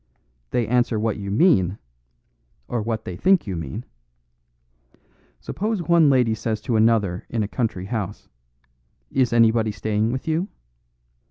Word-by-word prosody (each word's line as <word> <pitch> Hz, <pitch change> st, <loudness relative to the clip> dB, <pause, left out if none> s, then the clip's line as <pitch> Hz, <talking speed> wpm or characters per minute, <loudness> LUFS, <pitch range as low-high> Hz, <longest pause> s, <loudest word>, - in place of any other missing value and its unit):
They 120 Hz, -, 0 dB
answer 120 Hz, -2 st, +1 dB
what 110 Hz, -1 st, -1 dB
you 100 Hz, -1 st, -5 dB
mean 100 Hz, -, +3 dB, 0.9 s
or 120 Hz, -, -2 dB
what 110 Hz, 0 st, -3 dB
they 90 Hz, -, -5 dB
think 185 Hz, -, +3 dB
you 95 Hz, -4 st, -4 dB
mean. 80 Hz, -6 st, -6 dB, 1.5 s
Suppose 210 Hz, -2 st, -3 dB
one 170 Hz, -3 st, +4 dB
lady 125 Hz, -4 st, +3 dB
says 110 Hz, 0 st, -2 dB
to 120 Hz, 0 st, -1 dB
another 110 Hz, -5 st, +2 dB
in 115 Hz, -2 st, -1 dB
a -, -, -2 dB
country 110 Hz, -5 st, -2 dB
house, 105 Hz, -2 st, -4 dB, 0.8 s
'Is 130 Hz, -3 st, +2 dB
anybody 115 Hz, -1 st, +4 dB
staying 105 Hz, +2 st, -1 dB
with 130 Hz, +4 st, -4 dB
you? 160 Hz, +4 st, 0 dB
115 Hz, 140 wpm, -23 LUFS, 105-125 Hz, 1.5 s, one